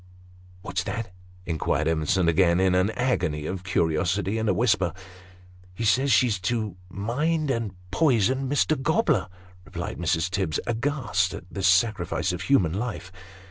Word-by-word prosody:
"What's 95 - -2
that?" 115 -6 -4 0.3
inquired 80 -2 -1
Evensou 80 +2 +1
again, 85 +1 +3
in 95 -1 +3
an 95 +2 +3
agony 85 - -1
of 95 +2 -4
curiosity 95 +4 0
and 110 -1 0
a - - +3
whisper. 95 -5 +2 0.4
" 90 0 -24
He 115 - -3
says 130 +6 +3
she's 110 -1 +3
to 110 -1 -2
mind 145 - -1
and 115 -6 -3 0.2
poison 130 -2 +2
Mr. 145 0 +1
Gobler," 160 - +1 0.4
replied - - -6
Mrs. 85 +3 0
Tibbs, 95 -6 -1
aghast 115 -7 -1
at 100 - -8
this 95 -1 0
sacrifice 95 -3 +2
of 90 - -5
human 95 - +2
life. 100 -3 -4
95 Hz, 145 wpm, -25 LUFS, 90-120 Hz, 0.4 s, again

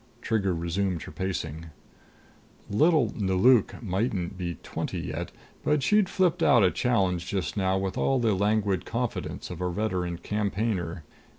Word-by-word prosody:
Trigger 105 -6 0
resumed 85 +1 -1
her - - -9
pacing. 85 -4 -4 1.0
Little 145 0 +3
Nelauk 105 +5 +3
mightn't 95 -2 -1
be 90 -2 -4
twenty - - -4
yet, - - -4 0.3
but 150 -2 +2
she'd 210 +4 +3
flipped 185 -3 +1
out 120 - +5
a 90 - +4
challenge 95 -8 +1
just 95 -2 -2
now 95 -2 +1
with 95 0 -2
all 135 - +2
the 115 -4 +2
languid 100 -1 +1
confidence 120 -4 -3
of 90 0 -7
a 90 - 0
veteran 90 -3 -2
campaigner. 100 -3 -2
95 Hz, 140 wpm, -27 LUFS, 90-115 Hz, 1.0 s, out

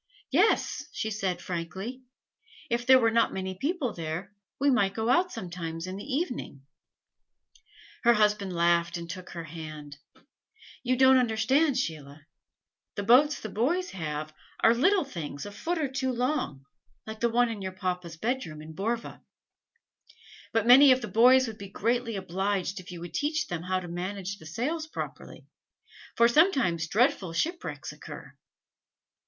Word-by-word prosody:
"Yes," 360 +10 +2
she 220 - -3
said, 190 -4 -2
frankly. 190 +9 -5 0.7
"If 240 +1 -1
there 260 0 +9
were 230 -3 +3
not 230 +1 +3
many 190 0 -3
people 275 - -2
there, 170 +4 -5 0.3
we 280 +1 +3
might 200 -6 +2
go 225 +1 -1
out 355 +8 +3
sometimes 165 -2 -5
in 185 0 -5
the 200 - -7
evening 245 - -4 0.7
" 440 -2 -26
Her 235 0 +6
husband 210 -3 +2
laughed 170 0 +2
and 170 0 -7
took 185 0 -8
her 170 -1 -6
hand: 155 -2 -9 0.8
"You 255 0 +1
don't 260 0 +6
understand, 260 +5 +2
Sheila. 150 - -4 0.7
The 205 - -3
boats 265 +8 +5
the 220 - -5
boys 325 - 0
have 155 -3 -5 0.3
are 225 - +7
little 365 +10 +3
things 155 - -6
a 205 - -7
foot 335 +12 -3
or 305 -3 0
two 265 0 -2
long 245 - -2 0.4
like 220 0 -7
the 235 - +2
one 240 +1 +3
in 220 -3 -5
your 190 -1 -4
papa's 180 -3 -4
bedroom 225 -7 -3
in 155 +1 -10
Borva. 225 +7 -3 1.3
But 225 -1 +1
many 265 +3 +9
of 255 0 +4
the - - -3
boys 250 +6 +6
would 220 -3 -7
be 200 -1 -8
greatly 230 +3 -1
obliged 190 +1 -2
to - - -5
you - - -18
if - - -10
you 175 - -7
would 175 - -8
teach 305 +1 0
them 175 - -4
how 185 +1 -1
to 180 - -8
manage 190 +3 -5
the 160 - -11
sails 305 - -3
properly, - - -7 0.7
for 235 - +6
sometimes 235 - +3
dreadful 200 -4 +1
shipwrecks 340 - -3
occur." - - -11
210 Hz, 165 wpm, -28 LUFS, 175-255 Hz, 1.3 s, there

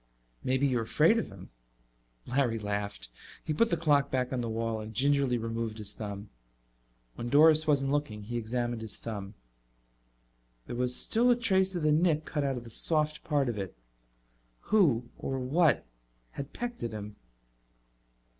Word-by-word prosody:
"Maybe 130 +2 +1
you're 125 -4 +1
afraid 160 - +3
of - - -3
him." 95 -1 -12 0.7
Larry 125 -3 +1
laughed. 100 - -4 0.3
He 155 - -2
put 230 +9 +3
the 170 - +1
clock 145 -3 +3
back 130 0 -1
on 125 - -1
the 115 - -3
wall 115 0 -2
and 110 0 -9
gingerly 140 -1 +2
removed 115 -1 -3
his 105 -1 -3
thumb. 100 -1 -7 0.8
When 120 - -5
Doris 155 +3 +6
wasn't 135 -2 +2
looking 130 -8 -2
he 120 +4 -6
examined 120 0 -2
his 110 -2 -5
thumb. 105 -2 -6 1.3
There - - -6
was 125 0 0
still 240 +2 +3
a 245 - +6
trace 190 -6 +2
of 170 - -2
the 155 - +3
nick 155 -1 +2
cut 150 -3 -2
out 135 -2 -1
of 120 - -6
the 115 - -11
soft 155 +4 +1
part 145 -3 +1
of 115 -4 -2
it. 95 -10 -6 0.9
Who 140 - +3
or 135 - -3
what 140 - +2 0.5
had 140 0 -7
pecked 240 0 -5
at 115 -1 -3
him? 105 -1 -7
125 Hz, 165 wpm, -30 LUFS, 110-150 Hz, 1.3 s, Doris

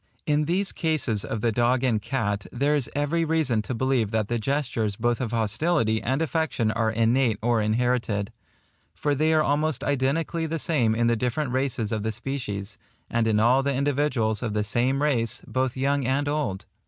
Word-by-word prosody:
In 150 0 +2
these 185 +5 0
cases 150 -10 0
of 110 - -4
the 115 - +2
dog 120 +3 +1
and 115 -5 +1
cat, 105 -5 -2
there 140 +4 +1
is 140 -5 -1
every 145 +4 +1
reason 155 -8 +1
to 120 +4 -4
believe 130 -3 +1
that 110 -1 -1
the 120 -1 0
gestures 115 -4 -1
both 120 +2 0
of 120 - -1
hostility 115 - +1
and 135 +6 0
affection 160 -8 0
are 115 0 0
innate 115 +1 +2
or 115 0 +1
inherited; 110 -2 0 0.6
for 145 - 0
they 155 +3 +2
are 155 -1 +4
almost 150 -1 0
identically 145 +4 0
the 165 +1 -2
same 125 -9 +1
in 120 +1 +1
the 115 0 +3
different 125 +4 -1
races 130 -4 -1
of 110 -2 -1
the 110 +1 -1
species, 110 -4 -5 0.3
and 115 -1 +1
in 105 -1 +2
all 120 +5 +4
the 140 0 -1
individuals 135 -6 +1
of 110 -4 -3
the 105 - +1
same 125 +7 0
race, 120 -7 0
both 130 0 -1
young 140 -1 0
and 140 +2 0
old. 145 -10 -2
125 Hz, 190 wpm, -25 LUFS, 110-145 Hz, 0.6 s, are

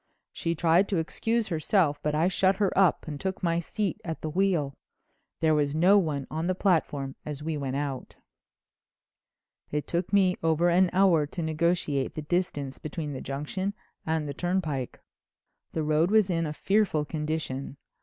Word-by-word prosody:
She 165 0 -2
tried 170 +4 +3
to 195 - +1
excuse 225 +7 -1
herself 160 -2 +1
but 150 0 -1
I 160 +3 +3
shut 190 +1 +2
her 200 -1 0
up 185 -5 +3
and 145 -2 -6
took 190 0 -3
my 170 -1 +2
seat 195 +3 -3
at 160 -2 -5
the 155 - -3
wheel. 170 -6 +1 0.7
There 160 -1 +4
was 145 -1 +1
no 185 +6 +6
one 150 -7 -2
on 160 +2 -2
the 185 - +1
platform 150 -8 0
as 150 -1 -6
we 160 0 -2
went 135 -2 -3
out. 140 -3 -4 1.5
"It 150 -1 -2
took 175 +1 -2
me 190 -3 +3
over 165 +2 +2
an 180 +1 +4
hour 180 -5 +4
to 170 +3 -5
negotiate 160 -3 0
the 155 - -4
distance 150 -5 -2
between 155 -1 -5
the 130 - -5
Junction 185 +9 -3 0.3
and 160 -1 -1
the 140 - -4
turnpike. 160 -6 -2 0.7
The 160 - -1
road 155 +3 +2
was 210 -3 +4
in 165 -2 0
a - - -3
fearful 195 -4 +1
condition. 150 -3 -4
160 Hz, 170 wpm, -27 LUFS, 150-185 Hz, 1.5 s, no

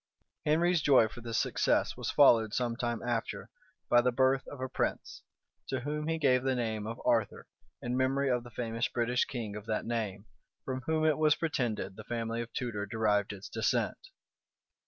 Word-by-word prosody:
Henry's 170 +2 +3
joy 135 -6 +5
for 120 - -11
this 115 -1 -3
success - - +1
was - - -4
followed, 110 -2 +5
some 120 -2 0
time 120 -1 -2
after, 120 -2 -3 0.4
by 120 - +5
the 125 +1 +2
birth 130 +2 +2
of 145 - -9
a 130 - -2
prince, 130 - -3 0.5
to 130 -2 -2
whom 150 +3 -3
he 165 0 0
gave 130 -5 +3
the 130 0 0
name 110 -3 -2
of 115 +2 -5
Arthur 115 -3 +1 0.4
in 120 +1 -2
memory 135 +2 +1
of 125 -2 +1
the 120 - -11
famous 115 0 -2
British 120 +1 0
king 110 -5 -5
of 105 +1 -8
that 110 -1 -1
name, 110 -4 -3 0.4
from 130 -1 -3
whom 160 0 +1
it 155 -1 +2
was 155 -1 +4
pretended 125 - -2
the 110 - -8
family 115 0 -3
of 120 0 -7
Tudor 105 -5 -3
derived 105 -1 +1
its 100 -2 -8
descent. - - -1
120 Hz, 185 wpm, -31 LUFS, 115-130 Hz, 0.5 s, joy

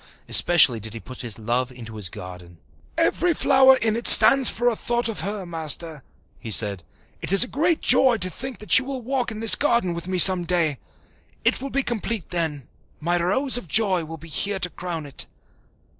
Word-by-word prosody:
Especially 155 -9 +4
did 110 +1 -9
he - - -8
put 130 +2 -12
his 120 -5 -3
love 120 +3 -4
into 115 -3 -13
his 105 -4 -1
garden. 90 -1 -12 0.4
"Every 345 -2 -1
flower 265 -2 +3
in 220 -2 -1
it 235 - +1
stands 270 -2 +7
for 240 +2 -3
a 240 - 0
thought 240 +2 -4
of 225 - -6
her, 200 +2 -6
Master," 160 -2 -3 0.4
he 115 - -10
said. 100 -3 +1 0.4
"It - - -6
is 195 - +6
a - - -7
great 325 +5 -2
joy 250 -1 +2
to 185 - -2
think 260 +6 -9
that 210 -6 -11
she - - +7
will 260 -1 -8
walk 255 0 -3
in 220 -1 -8
this 225 - +5
garden 235 -11 -1
with 170 +1 -9
me 185 0 -4
some 180 0 +7
day. 165 -5 -2 0.7
It - - 0
will 275 - -7
be 275 +1 -3
complete 225 -5 -5
then 160 -7 -2 0.3
my 175 +2 -2
Rose 250 +9 0
of 215 - -9
joy 190 -2 +1
will 160 +1 -10
be 165 +2 -15
here 200 +5 -3
to 180 - -1
crown 170 -4 -8
it." 140 - -4
180 Hz, 205 wpm, -21 LUFS, 145-240 Hz, 0.7 s, stands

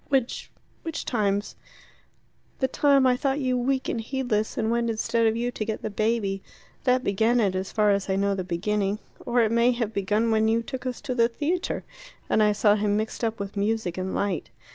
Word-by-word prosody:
"Which 265 -3 0 0.3
which 325 -2 -5
times?" 205 -3 0 1.0
"The 265 - +1
time 275 0 +3
I 255 -1 +4
thought 275 +1 0
you 255 -2 0
weak 260 +2 0
and 230 - -1
heedless, 225 -3 -1
and 225 -1 0
went 235 0 +1
instead 230 +1 +1
of 220 - +1
you 240 +1 -1
to 225 - -3
get 220 0 -4
the 215 - -3
baby. 205 -2 0 0.4
That 255 0 +3
began 220 +5 +2
it, 200 -5 +2
as 185 +1 -3
far 210 -2 +3
as 200 -1 0
I 190 - +2
know 200 +1 +1
the 190 -1 -2
beginning. 200 +3 -1 0.3
Or 240 0 +3
it 220 -1 +2
may 235 +2 +4
have 230 -3 -2
begun 210 +3 +1
when 220 0 +3
you 230 +1 +2
took 260 +1 -5
us 250 - -4
to 255 - -3
the 230 -2 +4
theatre, 310 +9 -2 0.5
and 215 - +4
I 210 0 +5
saw 205 0 +4
him 205 0 +1
mixed 220 +2 -3
up 225 0 -1
with 200 0 -5
music 205 -3 -1
and 185 0 -3
light. 200 -4 -1
225 Hz, 210 wpm, -26 LUFS, 205-245 Hz, 1.0 s, I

